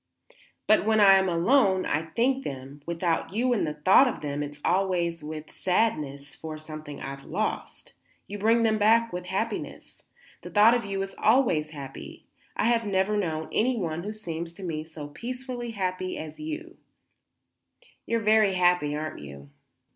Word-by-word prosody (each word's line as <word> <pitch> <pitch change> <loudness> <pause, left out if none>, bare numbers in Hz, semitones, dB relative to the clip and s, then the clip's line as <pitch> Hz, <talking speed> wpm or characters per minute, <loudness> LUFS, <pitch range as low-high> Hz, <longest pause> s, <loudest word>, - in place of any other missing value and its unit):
"But 215 - +4
when 220 +1 +3
I 200 -2 +8
am 190 -1 +4
alone 190 +2 +3
and 160 +1 -2
think 265 +3 +2
them, 135 +1 -7
without 170 +1 -1
you 245 +2 +2
in 215 - +1
the 150 -1 -4
thought 185 - +6
of 250 - -3
them, 145 -1 -3
it's 145 0 -6
always 175 -3 0
with 155 0 -8
sadness, 150 -8 -1
for 155 -1 -7
something 155 -2 -9
I've 135 0 -7
lost. - - -4 0.3
You 205 +1 -7
bring 225 +3 +3
them 220 -1 +2
back, 230 +1 +4
with 180 0 -5
happiness. 205 +4 -4 0.4
The - - -9
thought 215 +3 +6
of 240 -3 0
you 195 -1 -2
is 195 - -7
always 215 - +3
happy. 140 -3 -9 0.3
I - - +1
have 230 0 +3
never 200 0 +1
known 160 -6 -2
anyone 205 -9 0
who 205 +4 -5
seemed 170 -6 -5
to 195 - -10
me 155 -3 -3
so 155 -2 -9
peacefully 245 - -6
happy 185 -3 -3
as 155 -1 -8
you 310 0 -3
do. 345 +2 -15 1.3
You 230 - +1
are - - -3
very 215 -2 +4
happy, 180 -5 +2
aren't 155 +1 -5
you?" 70 -1 -11
185 Hz, 170 wpm, -27 LUFS, 155-220 Hz, 1.3 s, I